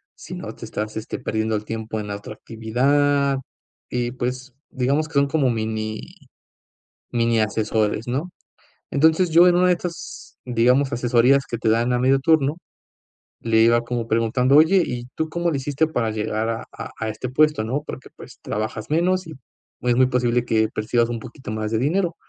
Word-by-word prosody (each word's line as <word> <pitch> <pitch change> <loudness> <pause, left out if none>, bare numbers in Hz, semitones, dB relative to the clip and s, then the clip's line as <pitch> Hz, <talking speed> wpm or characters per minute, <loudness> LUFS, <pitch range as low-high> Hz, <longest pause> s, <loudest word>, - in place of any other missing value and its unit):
si - - -9
no - - -7
te - - -9
estás, 110 +1 -5
este, 110 - -5
perdiendo 110 -3 -1
el 105 - -2
tiempo 110 0 -4
en 105 - -5
la 100 - -4
otra 105 - -9
actividad, 140 +6 +1 0.5
y, 120 -1 -2
pues, 125 +1 -4 0.2
digamos 140 +4 0
que 160 - -17
son 140 - +4
como 140 -3 +1 1.4
mini-miniasesores, 110 -2 -1
¿no? 140 +9 -2 0.6
Entonces 160 +5 +3
yo 170 +3 +7
en 175 - +4
una 180 - +4
de - - +5
estas, 170 -1 -8
digamos, 125 +3 +2
asesorías 125 +3 +3
que 120 - -1
te 110 - -1
dan 115 +3 +2
a 125 - +2
medio 130 +2 +3
turno, 150 0 +2 0.8
le 115 -1 +1
iba 120 +1 +4
como 120 -1 -3
preguntando: 120 +5 +2
"Oye, 175 +5 +6
¿y 120 -1 -4
tú 160 - -1
cómo 170 +2 -1
lo 150 - -1
hiciste 145 +3 0
para 120 -8 -1
llegar 110 +1 -2
a 115 0 -3
a - - -8
a 110 - -3
este 110 +4 -5
puesto, 150 -3 +3
no? 130 +6 -2
Porque, 130 - -8
pues, - - -13
trabajas 110 +1 -4
menos 180 +3 +1
y - - -7 0.5
es 120 -1 +2
muy 130 0 +5
posible 125 -1 +1
que 110 -1 +2
percibas 115 +2 0
un 115 - -3
poquito 125 +1 -9
más 110 -1 -3
de 110 - +1
dinero" 170 - 0
125 Hz, 180 wpm, -22 LUFS, 115-145 Hz, 1.4 s, yo